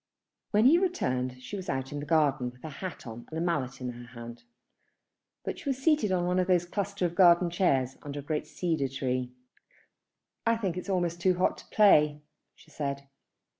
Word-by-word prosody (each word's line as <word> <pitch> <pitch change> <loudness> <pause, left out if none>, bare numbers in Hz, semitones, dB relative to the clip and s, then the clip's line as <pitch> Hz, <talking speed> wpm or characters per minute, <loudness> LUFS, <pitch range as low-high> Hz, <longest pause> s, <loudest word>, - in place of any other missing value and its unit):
When 215 +2 +3
he 320 +7 +7
returned 130 - -1
she 205 - -6
was 190 -2 -6
out 130 0 -2
in 145 - -4
the 145 - -6
garden 145 -5 +2
with 125 0 -18
her 160 - -5
hat 170 +1 -7
on 115 0 -9
and 160 - -5
a - - -1
mallet 145 -7 -1
in 125 -1 -4
her 120 0 -11
hand; 120 0 -9 1.0
but - - -4
she 280 - -4
was 265 - 0
seated 270 -7 +2
on 180 -1 +1
one 180 +1 +1
of 185 +1 0
a 180 -1 +5
cluster 200 +1 -2
of 170 - -1
garden 175 -1 +5
chairs 135 -8 +1
under 145 0 -6
a - - -7
great 150 +1 -2
cedar 160 -6 -1
tree. 130 -1 -2 1.1
"I 230 0 +2
think 195 -6 -2
it's 180 +2 -6
almost 175 -2 0
too 185 0 +3
hot 180 - +2
to - - -15
play," 150 -8 +4 0.3
she 155 - -20
said. 140 -2 -4
160 Hz, 205 wpm, -29 LUFS, 135-185 Hz, 1.1 s, he